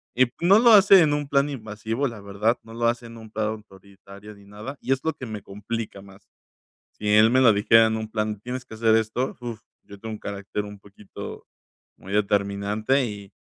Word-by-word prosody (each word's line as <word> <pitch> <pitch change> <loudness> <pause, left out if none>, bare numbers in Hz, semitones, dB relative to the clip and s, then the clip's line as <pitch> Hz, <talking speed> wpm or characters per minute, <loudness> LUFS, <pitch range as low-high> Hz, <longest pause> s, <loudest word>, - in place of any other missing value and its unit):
y 130 0 +4
no 195 +5 +6
lo 235 -1 +6
hace 195 -2 +8
en 150 -2 +3
un 145 -1 -2
plan 140 +1 +2
invasivo, 110 +1 -3
la 115 -4 -8
verdad, 100 +4 0
no 115 - -13
lo 115 0 0
hace 120 0 -1
en 115 0 -12
un 110 -1 -12
plan 110 0 -1
autoritario 100 -1 -11
ni 100 0 -18
nada, 105 +7 -9
y 135 - -3
es 135 - +2
lo 160 - 0
que 130 - -9
me 105 -3 -7
complica 105 +1 -6
más. 95 0 -17 0.7
Si 105 - -6
él 110 +2 +6
me 130 +1 +4
lo 115 -3 +7
dijera 115 +2 +5
en 110 0 -1
un 110 0 -5
plan, 105 -2 -2
tienes 125 +2 -6
que 110 - -11
hacer 110 0 +2
esto, 115 +4 -1
uf, 120 -2 -6 0.2
yo 100 0 -13
tengo 110 -1 -6
un - - -8
carácter 100 +1 -5
un 105 -1 -10
poquito 100 0 -11 0.5
muy 95 - -10
determinante 105 +5 0
y 100 -2 -9
110 Hz, 215 wpm, -24 LUFS, 100-120 Hz, 0.7 s, hace